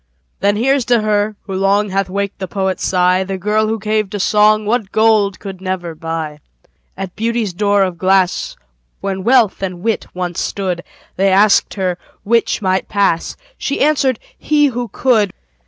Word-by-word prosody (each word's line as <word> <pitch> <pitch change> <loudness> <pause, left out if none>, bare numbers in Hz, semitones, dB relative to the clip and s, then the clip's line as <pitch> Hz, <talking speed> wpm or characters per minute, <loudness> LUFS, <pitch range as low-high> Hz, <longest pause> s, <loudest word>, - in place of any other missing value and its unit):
Then 205 +1 +2
here's 265 +4 +2
to 240 -2 +3
her, 210 0 0
who 195 - -7
long 200 +2 +1
Hath 195 0 -1
waked 200 +1 -3
the 190 - -4
poet's 190 0 -2
sigh, 180 0 +2
The 190 0 -4
girl 210 +3 +1
who 220 +1 -1
gave 215 -1 -1
to 205 - -5
song 210 +2 +3
What 215 -2 -1
gold 215 -3 +3
could 190 -2 -8
never 185 -3 -3
buy. 160 -1 -5 0.6
At 190 -2 -6
Beauty's 225 -3 -1
door 200 +1 +2
of 180 -2 -3
glass, 190 -1 +1 0.5
When 190 -1 -3
Wealth 235 -4 +3
and 185 -2 -4
Wit 225 -1 -1
once 180 -1 -3
stood, 185 -3 -3 0.3
They 195 +1 +3
asked 200 +2 +4
her 185 -3 -2 0.2
'which 230 0 +1
might 185 0 0
pass?" 200 -5 0 0.2
She 280 - -2
answered, 275 -4 +2 0.2
"he, 300 -1 +2
who 245 0 -3
could." 220 -6 +1
200 Hz, 170 wpm, -17 LUFS, 185-215 Hz, 0.6 s, asked